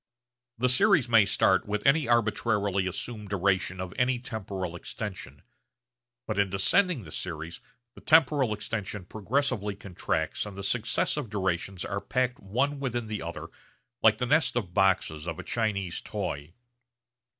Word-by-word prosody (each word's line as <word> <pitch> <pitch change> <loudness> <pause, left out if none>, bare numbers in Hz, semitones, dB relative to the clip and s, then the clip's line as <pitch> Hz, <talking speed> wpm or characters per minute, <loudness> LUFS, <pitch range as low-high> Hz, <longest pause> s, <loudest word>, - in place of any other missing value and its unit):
The 125 +3 +2
series 165 - +4
may 115 -3 +6
start 95 -1 +3
with 105 0 -2
any 140 +2 +4
arbitrarily 105 -4 +1
assumed 105 +2 -5
duration 95 -1 +1
of 90 -1 -5
any 125 0 +2
temporal 100 -7 -5
extension, 85 -7 -7 0.8
but 110 -2 -2
in 100 -1 +3
descending 135 - +2
the 80 - -11
series 80 0 -5 0.3
the - - -14
temporal 145 -6 +4
extension 105 -2 -4
progressively 110 0 -1
contracts 90 -2 -2
and 100 -2 -9
the 100 - -5
successive 120 +4 0
durations 95 -2 -2
are 100 0 -3
packed 125 +4 -1
one 135 +9 -1
within 120 -4 -2
the 105 -1 -4
other 85 +1 -6 0.5
like 110 -1 +5
the 125 - -1
nest 130 -1 +3
of 100 -8 -2
boxes 90 -5 +2
of 85 -2 -3
a - - -6
Chinese 100 -6 -1
toy. 70 +3 -4
105 Hz, 145 wpm, -28 LUFS, 95-120 Hz, 0.8 s, may